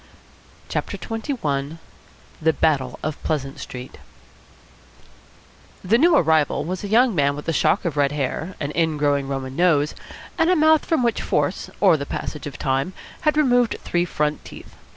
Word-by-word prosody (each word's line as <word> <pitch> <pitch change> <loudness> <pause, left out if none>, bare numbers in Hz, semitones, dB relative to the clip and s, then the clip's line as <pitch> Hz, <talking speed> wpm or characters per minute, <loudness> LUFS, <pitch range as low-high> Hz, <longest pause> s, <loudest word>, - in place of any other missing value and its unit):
CHAPTER - - -3
XXI 165 - -3 0.6
THE 160 +1 +3
BATTLE 140 -4 0
OF 155 0 -4
PLEASANT 135 -3 -3
STREET 125 0 -8 1.8
The 215 +6 +3
new 335 +3 +5
arrival 160 - +2
was 185 +3 -4
a - - -3
young 235 +3 +4
man 140 -4 +2
with 150 - -8
a 165 - +1
shock 185 - +2
of 165 -4 -1
red 140 -1 +3
hair, 150 +5 -3
an 145 0 -3
ingrowing 145 -4 +1
Roman 135 -1 -4
nose, 155 -4 +2 0.5
and 325 +1 +4
a 365 - +4
mouth 315 -1 +4
from 315 -6 +1
which 235 -1 +1
force - - -1
or 160 - +5
the 140 -1 -5
passage 150 -1 -5
of 145 - -8
time 135 +6 -1 0.4
had 300 - -1
removed 245 -5 +3
three 175 0 0
front 150 -3 -2
teeth. - - -12
160 Hz, 160 wpm, -22 LUFS, 140-220 Hz, 1.8 s, new